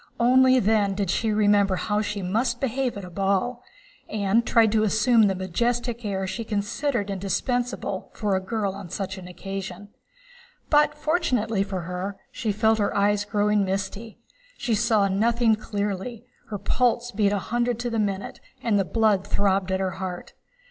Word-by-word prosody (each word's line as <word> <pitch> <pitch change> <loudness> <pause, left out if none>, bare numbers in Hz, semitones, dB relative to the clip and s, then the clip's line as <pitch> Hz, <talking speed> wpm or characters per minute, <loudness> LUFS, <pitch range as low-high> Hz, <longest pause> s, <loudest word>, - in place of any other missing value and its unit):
Only 255 +2 +5
then 205 -2 +2
did 195 -3 -1
she 225 +2 0
remember 205 -2 +3
how 210 +3 0
she 205 -2 -3
must 235 +6 0
behave 260 -2 -1
at 200 - -6
a - - -9
ball, 195 +6 0 0.5
and 215 +2 +1
tried 230 -2 +4
to 220 0 +3
assume 220 +1 +4
the 195 - 0
majestic 235 +6 -1
air 195 -2 -2
she 230 +5 -4
considered 210 +1 -2
indispensable 200 +2 -2
for 205 -3 0
a - - +1
girl 200 0 -2
on 195 -2 -9
such 190 +1 -4
an 180 - -10
occasion. 195 +2 -7 0.8
But, 295 0 +4
fortunately 255 - 0
for 195 -2 -2
her, 180 +3 -5
she 230 -5 -2
felt 220 +2 +2
her 205 - 0
eyes 205 0 +2
growing 210 0 +2
misty, 195 +3 -4 0.4
she 235 - -1
saw 215 -2 +3
nothing 225 +4 +2
clearly, 210 +2 -4 0.2
her 210 - -3
pulse 245 +3 0
beat 205 -2 +2
a 205 - +1
hundred 240 +3 -1
to 240 -1 -2
the 225 - 0
minute, 200 -2 -2 0.2
and 210 -3 +2
the - - +3
blood 215 -2 +2
throbbed 195 -1 +1
at 190 - 0
her 190 -1 -1
heart. 180 -2 -5
210 Hz, 170 wpm, -25 LUFS, 195-235 Hz, 0.8 s, Only